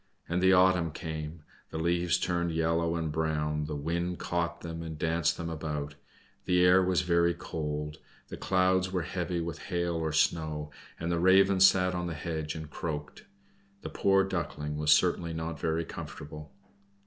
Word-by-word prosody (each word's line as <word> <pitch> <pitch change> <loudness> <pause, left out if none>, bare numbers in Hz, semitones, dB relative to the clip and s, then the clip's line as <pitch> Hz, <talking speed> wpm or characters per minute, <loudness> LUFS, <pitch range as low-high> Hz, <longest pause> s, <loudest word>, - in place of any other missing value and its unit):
And 85 +1 0
the 95 0 +5
autumn 90 -2 +4
came, 80 0 -6 0.3
the - - -5
leaves 85 +1 +1
turned 85 -1 -1
yellow 85 +1 +1
and 80 -2 -2
brown, 75 -1 -1
the 75 0 -4
wind 85 +4 -2
caught 85 0 -2
them 85 -1 -6
and 80 -2 -6
danced 80 0 +1
them 85 - -4
about, 75 -3 -4 0.5
the 90 0 +4
air 90 +1 +6
was 90 -1 +2
very 85 -1 +2
cold, 75 -3 -4 0.3
the - - -6
clouds 95 0 +2
were 90 -3 -1
heavy 85 -1 -2
with 85 -1 -5
hail 85 -1 0
or 80 -1 -1
snow, 75 -1 0 0.3
and 85 +1 -2
the 85 - +1
Raven 95 +2 +5
sat 95 -1 +5
on 90 0 -2
the 85 - -4
hedge 80 0 -4
and 80 -1 -6
croaked. 75 -3 -5 0.6
The - - -4
poor 95 0 +3
Duckling 85 -5 -3
was 75 0 +2
certainly 85 +1 +3
not 80 -1 -4
very 80 +1 -1
comfortable. 75 0 -8
85 Hz, 170 wpm, -29 LUFS, 80-90 Hz, 0.6 s, air